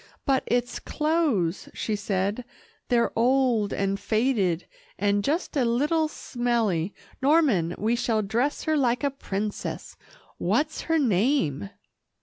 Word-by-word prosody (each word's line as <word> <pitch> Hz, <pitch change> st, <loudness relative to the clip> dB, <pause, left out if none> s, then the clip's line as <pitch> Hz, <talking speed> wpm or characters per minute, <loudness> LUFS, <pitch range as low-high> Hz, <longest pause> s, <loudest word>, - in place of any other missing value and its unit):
"But 270 Hz, -1 st, +3 dB
its 245 Hz, 0 st, 0 dB
clothes," 300 Hz, -, 0 dB
she 215 Hz, -, -1 dB
said, 200 Hz, +3 st, -1 dB, 0.4 s
"they're 235 Hz, -1 st, +2 dB
old, 240 Hz, -3 st, +2 dB
and 195 Hz, 0 st, -1 dB
faded, 205 Hz, -5 st, +1 dB, 0.3 s
and 205 Hz, 0 st, +1 dB
just 315 Hz, -, -1 dB
a 275 Hz, -, +3 dB
little 295 Hz, +7 st, +2 dB
smelly. 230 Hz, -, -1 dB, 0.3 s
Norman, 265 Hz, -, +3 dB
we 225 Hz, +3 st, +1 dB
shall 225 Hz, -3 st, 0 dB
dress 240 Hz, +8 st, -1 dB
her 315 Hz, -, +1 dB
like 250 Hz, -2 st, +1 dB
a 280 Hz, -, +1 dB
princess 210 Hz, -6 st, -4 dB, 0.4 s
what's 310 Hz, +1 st, 0 dB
her 325 Hz, -, +4 dB
name?" 205 Hz, -, +1 dB
235 Hz, 125 wpm, -26 LUFS, 200-275 Hz, 0.4 s, her